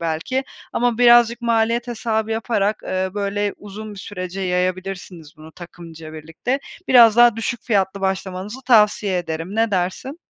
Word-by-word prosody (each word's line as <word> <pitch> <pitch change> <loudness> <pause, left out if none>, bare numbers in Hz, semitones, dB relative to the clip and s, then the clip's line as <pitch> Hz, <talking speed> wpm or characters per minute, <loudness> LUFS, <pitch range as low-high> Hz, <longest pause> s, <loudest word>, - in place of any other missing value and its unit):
belki 165 +12 -2 0.3
ama 240 -1 0
birazcık 240 -1 +5
maliyet 235 0 +1
hesabı 220 -2 -2
yaparak, 220 -2 -1
ııı, 185 0 -3
böyle 205 0 -2
uzun 210 +1 -9
bir - - -11
sürece 190 -1 -6
yayabilirsiniz 180 -3 -3
bunu 155 +1 -14
takımca 165 -2 -11
birlikte. 160 - -4 0.3
Biraz 235 -4 +7
daha 240 -2 +6
düşük 225 +1 -3
fiyatlı 200 -3 0
başlamanızı 190 +4 -3
tavsiye 210 -5 +3
ederim. 165 +2 -5
Ne 225 0 +2
dersin? 195 - -3
205 Hz, 140 wpm, -20 LUFS, 185-230 Hz, 0.3 s, Biraz